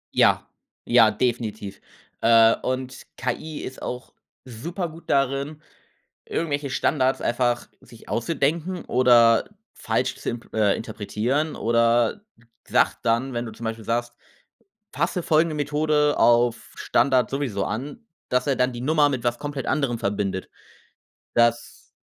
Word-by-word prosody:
Ja, - - +3 0.4
ja, - - +6
definitiv. 110 -5 -3 0.4
Äh, 115 0 +6
und 130 0 -4
KI 145 +5 -4
ist 130 - -8
auch 125 +1 -6 0.3
super 170 - -5
gut 165 +2 -14
darin, 140 +2 0 0.7
irgendwelche 145 -4 -2
Standards 130 +1 +1
einfach 120 0 0
sich 115 - -16
auszudenken 165 +7 -1
oder 120 -1 +4 0.2
falsch 130 +1 -1
zu - - -4
impl 120 0 -7
äh, 105 -2 +3
interpretieren 115 +8 -2
oder 115 - +2 0.5
sagt - - +2
dann, 120 +3 0
wenn 120 0 -2
du - - -7
zum 115 - -12
Beispiel 110 -1 -4
sagst: 120 +1 -1 0.8
„Fasse 180 - -1
folgende 160 0 +2
Methode 150 0 +1
auf 120 0 +3
Standard 130 -4 +2
sowieso 130 -8 -2
an“, 145 - -5 0.2
dass 125 +2 +1
er 135 - +1
dann 125 0 +1
die 120 - -7
Nummer 150 0 +3
mit 125 -3 -3
was 120 0 0
komplett 145 -2 -5
anderem 135 -6 0
verbindet. 100 -3 -2 0.9
Das 120 0 0
125 Hz, 130 wpm, -24 LUFS, 115-145 Hz, 0.9 s, ja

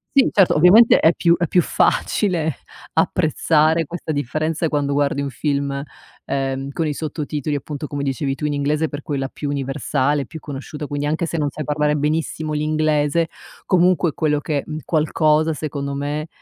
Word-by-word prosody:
Sì 275 - +5
certo, 195 -3 +4
ovviamente 190 +9 +7
è 160 - +5
più 170 0 +3
è 175 - 0
più 180 - +3
facile 165 - +1 0.4
apprezzare 160 +1 +2
questa 165 0 -5
differenza 155 +4 -1
quando 145 -2 -1
guardi 140 0 +1
un 140 - -2
film, 140 +1 -2 0.4
ehm, 135 0 -2
con 160 +2 -1
i 150 - -1
sottotitoli, 150 -1 -3
appunto 145 +1 -5
come 145 -1 -4
dicevi 135 0 -1
tu, 150 - -4
in 150 - 0
inglese 150 +2 0
per 145 - -6
quella 135 -3 -2
più 145 - -6
universale, 140 0 -1
più 160 +6 -9
conosciuta, 145 +1 -7
quindi 145 0 -3
anche 155 +3 0
se 165 - -3
non 145 -2 0
sai 155 - -6
parlare 150 +1 +1
benissimo 155 +1 -1
l'inglese, 155 +1 +1 0.4
comunque 180 -1 +3
è - - -7
quello 150 -2 +1
che, 145 -1 -2
mhmm, 155 0 -5
qualcosa 155 0 +2
secondo 140 -2 -4
me, 145 +2 -3
150 Hz, 170 wpm, -20 LUFS, 145-160 Hz, 0.4 s, ovviamente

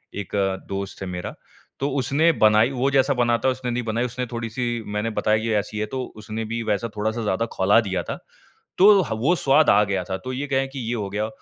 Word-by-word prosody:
एक 100 -2 -6 0.4
दोस्त 100 0 -5
है 95 - -4
मेरा 90 -1 -5 0.4
तो 140 - 0
उसने 140 +6 +3
बनाई, 110 -3 +4
वो 135 +1 0
जैसा 140 +1 +3
बनाता 120 -1 +1
है - - +4
उसने 125 -1 -4
नहीं 120 +1 -2
बनाई 115 +2 -1
उसने 125 +1 -3
थोड़ी-सी 120 0 -3
मैंने 105 +2 -1
बताई 110 0 +1
ये 115 -1 0
ऐसी 105 +2 -6
है 110 - 0
तो 130 - -1
उसने 110 +1 -5
भी 115 +2 -3
वैसा 110 +1 -1
थोड़ा-सा 110 +2 -2
ज़्यादा 105 +2 0
ख़ौला 95 +4 +4
दिया 95 -4 -2
था। - - -5 0.6
तो 190 - +7 0.3
वो 135 +11 +2
स्वाद 150 0 +3
आ 105 - +5
गया 100 -2 -1
था 95 - -3
तो 130 - -4
ये 135 +3 -3
कह 135 -1 0
कि 135 - -6
ये 120 - -1
हो 105 -4 -3
गया। 105 +2 -2
115 Hz, 225 wpm, -23 LUFS, 105-130 Hz, 0.6 s, तो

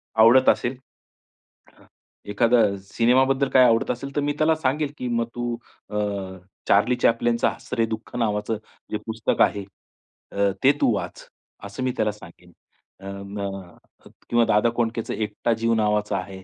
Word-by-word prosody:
आवडत 115 +4 +6
असेल. 125 +2 +1 1.0
हां. - - -22 0.5
एखादा 115 +3 +3 0.3
सिनेमाबद्दल 130 +3 +3
काय 130 - +6
आवडत 115 -2 +2
असेल 140 +3 -6
तर 145 - +1
मी 145 0 0
त्याला 155 +1 +3
सांगेल, 145 0 -1
की 125 - -4
मग 115 -1 -1
तू 120 -1 -2 0.3
अ, 105 - -4 0.7
चार्ली 105 +5 +4
चॅप्लिनचा 115 0 +2
'हसरे 115 - -2
दुःख' 110 +2 -7
नावाचं 105 -1 -1 0.3
जे 105 - -1
पुस्तक 110 0 -1
आहे 100 -1 +2 0.7
अ, 100 0 +1
ते 135 - +7
तू 115 - +4
वाच, - - -6 0.4
असं 100 +6 -6
मी 130 - 0
त्याला 110 -1 +1
सांगेन. 90 -3 -15 0.5
अ, 95 - -13
अ, - - -5
मग 100 -2 -7 0.5
किंवा 120 -1 +3
दादा 105 +3 +3
कोंडकेच 115 -1 -1
'एकटा 110 +2 -1
जीव' 115 0 +1
नावाचा 105 -2 0
आहे 95 0 -7
115 Hz, 155 wpm, -23 LUFS, 105-125 Hz, 1.0 s, ते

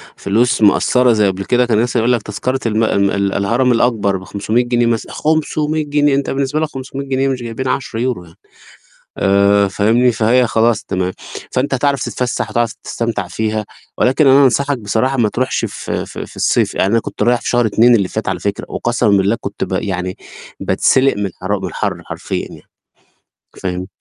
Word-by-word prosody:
فلوس 120 +4 +1
مأثرة 125 +4 +4
زي 105 -2 +3
قبل 95 0 -3
كده، 125 0 +2
كان 115 -3 +1
مثلًا 120 0 0
يقول 120 +2 +2
لك 120 - 0
تذكرة 125 +6 -3
الم 110 0 +1
ال 100 -2 +2
ال 100 -1 0
الهرم 120 +6 +1
الأكبر 115 -5 +1
ب500 100 +5 -1
جنيه 120 0 +1
مثلًا، 115 -1 -1
500 155 0 0
جنيه! 145 -1 +2
أنت 140 0 -1
بالنسبة 140 +2 -1
لك 155 -1 -1
500 135 +1 -6
جنيه 135 0 0
مش 130 -2 -3
جايبين 120 +3 -4
10€ 125 -4 -2
يعني. 85 -1 -18 0.8
آآ، 100 +1 +3
فاهمني 115 +6 +2
فهي 115 +3 +3
خلاص 115 0 +1
تمام، 95 -1 -2 0.4
فأنت 135 +2 0
هتعرف 140 +1 0
تتفسح، 125 -3 -2
هتعرف 115 0 0
تستمتع 115 -5 -3
فيها، 110 +3 -2 0.3
ولكن 135 +3 +3
أنا 135 +1 +6
أنصحك 140 +2 +1
بصراحة 115 +5 0
ما 115 -3 +3
تروحش 130 +4 -1
ف - - -6
ف - - -4
في - - -8
الصيف، - - +1
يعني 95 - +1
أنا 115 - +3
كنت 105 - -5
رايح 120 +1 +2
في - - -5
شهر 120 -1 +2
2 115 +3 +4
اللي 100 -5 +2
فات - - -4
على - - -2
فكرة، - - -3
وقسمًا 120 -1 0
بالله 100 +2 +3
كنت 100 - -4
ب - - -9
يعني 95 -1 -2 0.4
باتسلق 135 -2 +2
من 100 0 -1
الحرا 95 +2 -3
الحر - - -3
حرفيًا - - -4
يعني. - - -13 1.0
فاهم، 90 0 -3
115 Hz, 180 wpm, -17 LUFS, 100-130 Hz, 1.0 s, أنا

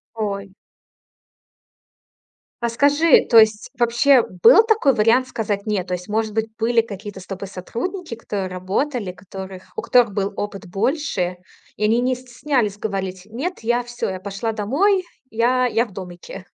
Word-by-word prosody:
Ой. 200 -3 -4 2.1
А 235 - 0
скажи, 290 +6 +4
то 230 - +5
есть, 220 +1 +3
вообще, 240 +2 +4 0.2
был 440 - +9
такой 440 - +3
вариант 230 +4 +3
сказать 210 -4 -3
"нет"? 200 -4 -1
То 180 - -3
есть, 180 +2 -9
может 215 0 -1
быть, 220 0 0
были 230 +1 +2
какие-то 205 -2 -8
с 185 - -12
тобой 195 0 -6
сотрудники, 240 - -5
которые 205 -4 -4
работали, 190 +4 -2
которых 190 0 -9
у - - -2
которых 240 -5 +3
был 200 0 -1
опыт 205 -1 -5
больше, 195 - -1 0.4
и 210 - -4
они 225 +3 +3
не 255 +1 +1
стеснялись 250 -4 -2
говорить: 190 -3 -4
"Нет, 270 - -4
я 240 +2 +1
всё, 240 -3 -4
я 185 -1 -4
пошла 200 +3 -4
домой. 345 - +2 0.3
Я 250 +3 +2
я 235 0 +1
в 210 - -15
домике." 185 +1 -9
220 Hz, 155 wpm, -21 LUFS, 195-250 Hz, 2.1 s, был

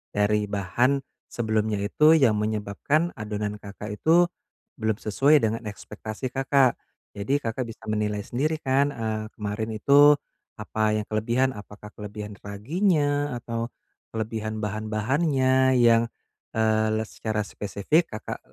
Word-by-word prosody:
dari 105 +1 +2
bahan 110 +8 +1 0.3
sebelumnya 110 -3 -1
itu 150 +10 +5
yang 120 -9 +4
menyebabkan 110 - 0
adonan 105 -1 -3
Kakak 105 +1 -8
itu, 170 +2 +4 0.5
belum 110 -1 +1
sesuai 140 +8 +4
dengan 115 +1 0
ekspektasi 110 +4 -6
Kakak. 135 -1 +3 0.4
Jadi 105 +8 0
Kakak 115 +3 -2
bisa 115 0 -11
menilai 105 -1 -1
sendiri 155 +5 -1
kan, 135 +2 +2
eee, 110 -2 -3
kemarin 105 +1 -3
itu 145 +6 +6 0.4
apa 110 -1 -1
yang 105 - 0
kelebihan, 120 +5 +1
apakah 105 -2 -11
kelebihan 105 0 -7
raginya 145 - 0
atau 115 0 -3 0.5
kelebihan 110 -1 -3
bahan 110 +1 -3
bahannya 130 +3 +2
yang, 115 -1 +5 0.5
eee, 110 0 +2
les 110 - -5
secara 110 -1 -2
spesifik 105 - 0
Kakak 110 - -5
110 Hz, 125 wpm, -25 LUFS, 105-135 Hz, 0.5 s, itu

